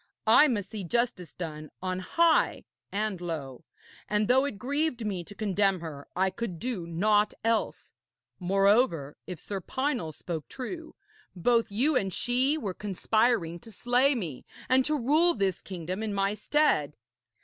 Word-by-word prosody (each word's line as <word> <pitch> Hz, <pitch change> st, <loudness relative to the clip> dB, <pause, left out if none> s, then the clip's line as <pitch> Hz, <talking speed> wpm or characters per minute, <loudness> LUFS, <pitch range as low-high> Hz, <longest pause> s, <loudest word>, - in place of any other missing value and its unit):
'I 230 Hz, +7 st, +7 dB
must 205 Hz, -7 st, -2 dB
see 210 Hz, -3 st, -5 dB
justice 195 Hz, -4 st, -1 dB
done 155 Hz, -3 st, -6 dB
on 185 Hz, 0 st, -2 dB
high 335 Hz, -, +2 dB, 0.3 s
and 205 Hz, -3 st, -2 dB
low, 150 Hz, -7 st, -5 dB, 0.5 s
and 210 Hz, 0 st, +1 dB
though 260 Hz, +2 st, +4 dB
it 280 Hz, -8 st, -4 dB
grieved 270 Hz, 0 st, -1 dB
me 190 Hz, -4 st, -2 dB
to 205 Hz, -, -12 dB
condemn 195 Hz, -2 st, +1 dB
her, 150 Hz, -4 st, -8 dB
I 190 Hz, +1 st, +2 dB
could 200 Hz, -3 st, -4 dB
do 215 Hz, -5 st, -4 dB
naught 210 Hz, +5 st, +2 dB
else. 225 Hz, 0 st, -1 dB, 0.5 s
Moreover, 195 Hz, -, +2 dB
if 180 Hz, -3 st, -6 dB
Sir 195 Hz, -2 st, -5 dB
Pinel 260 Hz, -, -2 dB
spoke 160 Hz, 0 st, -6 dB
true, 320 Hz, +6 st, -7 dB, 0.4 s
both 230 Hz, +4 st, +2 dB
you 265 Hz, +9 st, +2 dB
and 195 Hz, -6 st, +1 dB
she 255 Hz, -, +1 dB
were 205 Hz, -11 st, -3 dB
conspiring 210 Hz, -2 st, 0 dB
to 225 Hz, -, -12 dB
slay 245 Hz, +6 st, +2 dB
me 165 Hz, -, -5 dB, 0.2 s
and 260 Hz, 0 st, +4 dB
to 305 Hz, 0 st, +1 dB
rule 305 Hz, +7 st, +3 dB
this 195 Hz, -4 st, 0 dB
kingdom 185 Hz, +1 st, -5 dB
in 215 Hz, -2 st, -2 dB
my 195 Hz, +1 st, +1 dB
stead.' 210 Hz, -, +1 dB
205 Hz, 155 wpm, -28 LUFS, 180-245 Hz, 0.5 s, I